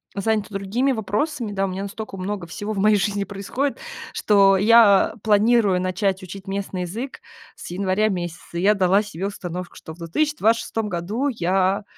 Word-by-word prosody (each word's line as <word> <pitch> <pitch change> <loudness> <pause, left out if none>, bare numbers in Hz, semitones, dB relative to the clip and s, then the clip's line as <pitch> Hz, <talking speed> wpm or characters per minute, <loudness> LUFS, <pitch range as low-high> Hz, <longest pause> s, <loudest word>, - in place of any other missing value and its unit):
занята 215 +1 0
другими 205 +7 0
вопросами, 220 +2 -2
да, 195 -1 0
у - - -2
меня 190 +1 -4
настолько 200 0 -7
много 185 -1 -4
всего 205 +6 -5
в 195 - -3
моей 215 +1 +4
жизни 200 0 0
происходит, 200 +8 -3 0.4
что 195 -2 +4
я 210 -1 +6
планирую 210 -2 +3
начать 185 +1 -1
учить 190 +2 -9
местный 195 -1 -3
язык 225 +10 -5 0.3
с - - -10
января 190 +3 +1
месяца, 175 -2 -5
я 195 +4 +4
дала 195 +1 +3
себе 195 -2 -5
установку, 180 -3 -6
что 160 - -10
в - - -17
2026 225 - 0
году 200 +10 -2
я 190 -4 +1
200 Hz, 160 wpm, -22 LUFS, 185-215 Hz, 0.4 s, я